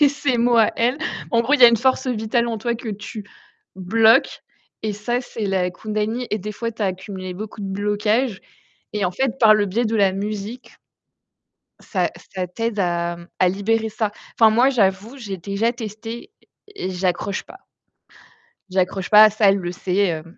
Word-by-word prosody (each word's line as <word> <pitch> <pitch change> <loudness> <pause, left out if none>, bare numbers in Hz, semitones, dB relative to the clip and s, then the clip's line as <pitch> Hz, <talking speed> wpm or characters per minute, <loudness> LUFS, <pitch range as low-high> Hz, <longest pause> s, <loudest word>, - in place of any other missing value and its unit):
c'est 290 - +7
ses 280 -3 -1
mots 240 0 +3
à 220 - +5
elle. 245 +5 +1 0.3
En 230 - +4
gros, 275 +5 +2
il 285 - 0
y - - +10
a - - +11
une 235 - +3
force 260 +3 +1
vitale 235 0 0
en 225 -2 -3
toi 235 +2 -1
que 225 -1 -6
tu 205 +1 -7 0.5
bloques 220 +5 +3 0.4
et 215 -1 -1
ça, 240 +4 -2
c'est 225 -4 -5
la 185 -2 0
kundalini. 215 +5 -3
et 215 - 0
des 210 +2 -6
fois, 230 +2 -4
tu 220 - -18
as 200 - +2
accumulé 185 0 -5
beaucoup 210 +2 -8
de 200 - -4
blocages 210 +3 0 0.5
et 210 -2 -1
en 180 - +1
fait, 260 +6 -1
par 215 -2 +7
le 210 -1 +2
biais 220 +6 0
de 225 0 0
la 195 -3 +3
musique 210 +4 -6 1.0
ça - - -1 0.3
ça 180 -1 -2
t'aide 225 +2 -3
à, 175 -1 -1
mmh, 170 0 -13
à 185 - +4
libérer 220 +4 0
ça, 215 -1 -2 0.3
enfin, 225 - +7
moi, 245 +4 +4
j'avoue, 210 +1 0
j'ai 205 -7 -6
déjà 200 +6 -1
testé 225 -1 -7 0.5
et 415 - -8
et - - -3
j'accroche 185 +1 -2
pas. 380 - -14 1.1
J'accroche 185 0 -1
pas 215 +1 +10
à - - +6
ça, 210 -1 +3
elle 195 - +3
le 175 -1 -4
sait, 180 +1 -3
hem, 165 0 -5
215 Hz, 195 wpm, -21 LUFS, 190-230 Hz, 1.1 s, a